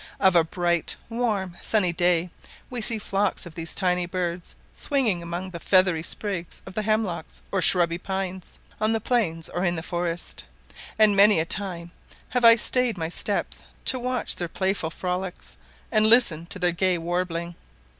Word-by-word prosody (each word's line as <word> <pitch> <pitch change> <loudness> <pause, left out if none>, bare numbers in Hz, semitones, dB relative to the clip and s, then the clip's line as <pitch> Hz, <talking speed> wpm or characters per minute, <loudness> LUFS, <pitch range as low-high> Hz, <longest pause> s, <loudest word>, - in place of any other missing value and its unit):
Of 190 -2 +4
a 170 - +6
bright 175 0 0
warm, 210 -7 -2
sunny 190 -6 +2
day 175 0 +1 0.4
we 245 -2 -3
see 225 +1 0
flocks 200 -2 -1
of 170 - -10
these 165 0 -5
tiny 180 -2 +1
birds 175 -1 -4 0.2
swinging 245 - 0
among 175 +2 -5
the 170 - -7
feathery 185 -2 +3
sprigs 175 0 -4
of 190 - -10
the 215 - -1
hemlocks 210 -6 -2
or 195 - 0
shrubby 170 -2 +4
pines 190 -1 -5 0.2
on 215 +1 +2
the 225 - 0
plains 195 -9 0
or 175 - -3
in 175 -2 +1
the 160 - -4
forest; 175 0 -3 0.5
and 215 -2 +5
many 200 -2 +6
a 160 - 0
time 175 -2 0 0.4
have 250 -1 0
I 230 0 +9
stayed 245 -1 +1
my 160 -1 -3
steps - - -2 0.2
to 260 - +3
watch 250 0 -1
their 175 - -2
playful 190 -1 -1
frolics, 180 +2 -5 0.4
and 215 -1 +4
listen 200 -9 +4
to 190 - -1
their 180 -1 +1
gay 180 +1 +1
warbling. 170 0 -3
185 Hz, 170 wpm, -25 LUFS, 170-210 Hz, 0.5 s, I